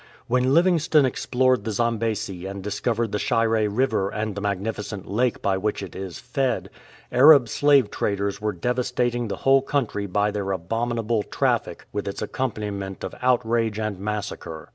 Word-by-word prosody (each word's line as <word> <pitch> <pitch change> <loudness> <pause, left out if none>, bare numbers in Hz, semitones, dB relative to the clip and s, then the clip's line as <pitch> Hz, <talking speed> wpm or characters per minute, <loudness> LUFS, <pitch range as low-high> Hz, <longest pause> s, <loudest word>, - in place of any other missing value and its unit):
When 125 +3 +2
Livingstone 165 -4 +4
explored 130 0 +1
the - - -3
Zambesi 110 -4 -1
and 100 0 -6
discovered 110 +2 -1
the 105 - -1
Shire 110 -1 +1
River 105 -3 +1
and 110 0 -3
the 100 - -5
magnifi 100 +2 -2
cent 100 -2 -7
lake 120 +4 0
by 95 -1 +1
which 105 0 -2
it 95 - -9
is 95 -2 -6
fed, 130 +1 -2 0.4
Arab 140 -1 +7
slave 140 0 +4
raiders 100 0 -1
were 105 0 0
devastating 120 +3 -1
the 100 - -3
whole 135 0 +6
country 120 -7 -1
by 105 +2 +1
their 100 -1 -3
abominable 115 +4 -1
traffic - - -1
with 105 -1 -3
its 100 - -4
accompaniment 105 -5 -4
of - - -5
outrage 115 -3 +1
and 110 -3 -3
massacre. 100 -6 -5
110 Hz, 160 wpm, -24 LUFS, 100-125 Hz, 0.4 s, Arab